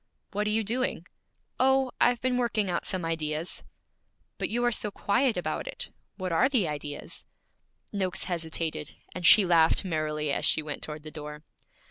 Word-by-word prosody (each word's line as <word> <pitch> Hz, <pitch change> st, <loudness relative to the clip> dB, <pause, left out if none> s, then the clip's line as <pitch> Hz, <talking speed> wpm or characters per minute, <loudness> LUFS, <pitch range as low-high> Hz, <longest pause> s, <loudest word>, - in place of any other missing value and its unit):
'What 210 Hz, +1 st, -1 dB
are -, -, +2 dB
you 220 Hz, +1 st, +2 dB
doing?' 245 Hz, +5 st, -1 dB, 0.5 s
'Oh 265 Hz, 0 st, +3 dB
I've 245 Hz, 0 st, +5 dB
been 255 Hz, 0 st, +1 dB
working 220 Hz, -6 st, +1 dB
out 170 Hz, -, -1 dB
some 185 Hz, -3 st, -2 dB
ideas.' 160 Hz, 0 st, -2 dB, 0.8 s
'But -, -, 0 dB
you 240 Hz, +2 st, 0 dB
are 240 Hz, -, +3 dB
so 215 Hz, -2 st, +1 dB
quiet 220 Hz, +4 st, +1 dB
about 160 Hz, -, -2 dB
it! -, -, -5 dB, 0.3 s
What 185 Hz, -3 st, -3 dB
are 205 Hz, +11 st, +4 dB
the 235 Hz, -11 st, +2 dB
ideas?' 145 Hz, -1 st, -6 dB, 0.7 s
Noakes 190 Hz, -3 st, 0 dB
hesitated, 160 Hz, -3 st, -3 dB, 0.2 s
and 180 Hz, -1 st, +1 dB
she 210 Hz, -, +8 dB
laughed 170 Hz, +1 st, +4 dB
merrily 155 Hz, -3 st, -1 dB
as -, -, -1 dB
she 155 Hz, -, +5 dB
went 150 Hz, -1 st, -5 dB
toward 150 Hz, -1 st, -5 dB
the 155 Hz, -, -8 dB
door. 150 Hz, -1 st, -8 dB
180 Hz, 170 wpm, -28 LUFS, 155-225 Hz, 0.8 s, she